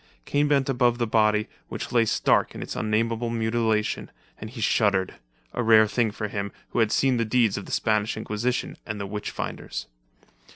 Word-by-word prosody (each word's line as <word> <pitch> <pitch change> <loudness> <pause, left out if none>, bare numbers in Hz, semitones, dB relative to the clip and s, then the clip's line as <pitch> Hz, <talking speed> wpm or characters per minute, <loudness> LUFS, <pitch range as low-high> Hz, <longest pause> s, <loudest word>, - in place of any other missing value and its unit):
Kane 145 +1 +1
bent 140 -2 +2
above 125 -3 +2
the 120 - 0
body, 110 -1 +2 0.2
which - - -5
lay 115 -2 +4
stark - - +2
in - - -5
its - - -6
unnameable 115 +2 0
mutilation, 110 -1 0 0.3
and 110 - -7
he 120 +1 -10
shuddered; 100 -4 +2 0.4
a - - -1
rare 110 -1 +6
thing 115 +2 +1
for 105 +1 -4
him, 100 -1 -4 0.2
who - - -2
had 110 -2 +3
seen 130 -2 +2
the 115 - +1
deeds 115 -2 +2
of 100 - -6
the - - -9
Spanish 110 -1 +1
Inquisition 110 +4 -2
and 105 -2 -5
the 100 - -3
witch 105 +1 -4
finders. - - -5
110 Hz, 190 wpm, -25 LUFS, 105-120 Hz, 0.4 s, rare